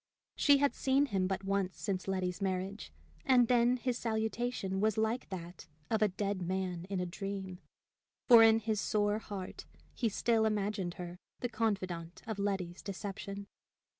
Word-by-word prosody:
She 285 -1 +5
had 285 0 +2
seen 270 +2 +2
him 195 -8 0
but 190 0 -2
once 195 -1 -1
since 190 -2 -2
Letty's 185 0 -1
marriage, 190 +1 -2 0.3
and 250 -3 +5
then 245 +1 +4
his 245 0 -2
salutation 220 -3 -1
was 215 0 +2
like 220 +3 0
that 175 -2 -7 0.2
of 220 -1 +2
a 215 - +6
dead 200 0 -2
man 180 -1 -2
in 195 -2 -1
a 180 - -1
dream; 190 0 -5 0.7
for 235 -3 +10
in 225 0 +7
his 215 -1 0
sore 205 0 +1
heart 200 -4 -7 0.3
he 230 - 0
still 220 +2 +2
imagined 205 -4 -1
her 180 0 -7 0.2
the 245 - -1
confidante 185 -6 -2
of 220 -2 -4
Letty's 190 -3 -2
deception. 200 0 -6
200 Hz, 160 wpm, -33 LUFS, 185-220 Hz, 0.7 s, for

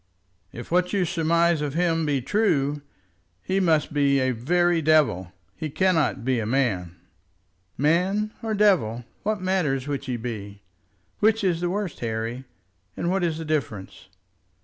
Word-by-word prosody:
"If 120 +5 -9
what 180 +2 +2
you 195 -3 +2
surmise 170 -1 +2
of 145 -1 -3
him 165 -2 +1
be 140 -4 0
true, 145 - +1 0.6
he 190 +1 0
must 160 -6 +2
be 140 -1 +3
a 130 0 +1
very 170 +8 +1
devil. 145 - +2 0.2
He 155 -1 -4
cannot 160 -7 +1
be 130 -2 +1
a 110 - -2
man 105 -9 0 0.4
" 90 0 -43 0.2
"Man 185 +8 +1
or 220 -1 -2
devil, 160 - +2 0.2
what 210 -2 -2
matters 150 -8 0
which 140 -1 -3
he 125 -2 -2
be? 105 -4 -7 0.6
Which 220 0 +3
is 175 -3 +1
the 175 - 0
worst, 195 -2 -3
Harry, 115 +2 -3 0.5
and 170 - -1
what 190 -1 0
is 165 -2 0
the 165 - -6
difference? 135 -14 -4
155 Hz, 155 wpm, -24 LUFS, 125-180 Hz, 0.6 s, be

